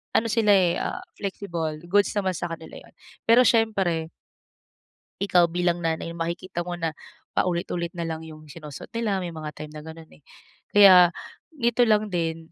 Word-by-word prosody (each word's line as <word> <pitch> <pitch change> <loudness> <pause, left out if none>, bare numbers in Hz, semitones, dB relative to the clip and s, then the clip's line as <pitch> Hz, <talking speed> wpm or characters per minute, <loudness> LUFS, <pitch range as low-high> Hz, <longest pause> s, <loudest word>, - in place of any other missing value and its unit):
ano 230 - +3
sila 215 -2 +3
eh, 175 -2 +3
ah, - - -3 0.2
flexible. 170 -6 -4
Goods 205 +1 +3
naman 190 -2 0
sa 175 - -3
kanila 160 0 -10
yun. - - -19 0.3
Pero 235 +2 +7
siyempre 195 -9 +1 1.1
ikaw 180 -3 +4
bilang 175 0 0
nanay, 165 0 -2
makikita 170 +1 -4
mo 175 0 -4
na 165 -2 -2 0.4
paulit-ulit 170 -1 -1
na 170 - -3
lang 160 0 -5
yung 155 -1 -12
sinusuot 150 -3 -10
nila, 210 -4 0
may 175 - -5
mga 155 -2 -6
time 150 0 -8
na 150 0 -9
gano'n 160 0 -11
eh. 145 - -20 0.5
Kaya 185 -4 +8 0.4
nito 240 -2 +2
lang 215 -1 +2
din, 165 -1 -3
175 Hz, 165 wpm, -25 LUFS, 160-200 Hz, 1.1 s, Kaya